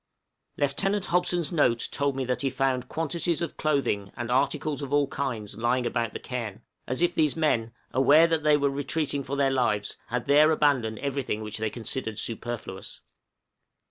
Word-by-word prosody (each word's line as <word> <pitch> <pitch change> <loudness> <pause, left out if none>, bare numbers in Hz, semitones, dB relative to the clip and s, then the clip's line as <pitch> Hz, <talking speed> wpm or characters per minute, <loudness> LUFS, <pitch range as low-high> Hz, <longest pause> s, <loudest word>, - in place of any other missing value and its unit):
Lieutenant 195 +8 0
Hobson's 175 -1 +1
note 125 -8 +2
told 140 -1 0
me 135 -1 -2
that 125 -1 -1
he 135 - +1
found 130 -1 -1
quantities 165 +1 -1
of 170 - -3
clothing 135 -10 0
and 120 0 -3
articles 145 +3 0
of 140 -1 -5
all 145 0 +3
kinds 115 -8 -4
lying 120 +2 +1
about 115 -2 -1
the - - -5
cairn, 115 -4 -5 0.2
as 130 +7 -1
if 175 0 +2
these 155 -3 +2
men, 115 -8 +1 0.2
aware 145 +5 +6
that 165 -2 +1
they 150 0 +4
were 140 -1 +1
retreating 145 +1 -1
for 135 +2 -4
their 140 -1 +2
lives, 110 -6 0
had 120 0 -2
there 150 +2 +6
abandoned 140 -8 +2
everything 135 -6 -2
which 105 0 -5
they 110 0 0
considered 110 -1 -4
superfluous. 115 -4 -5
135 Hz, 175 wpm, -27 LUFS, 120-150 Hz, 0.2 s, aware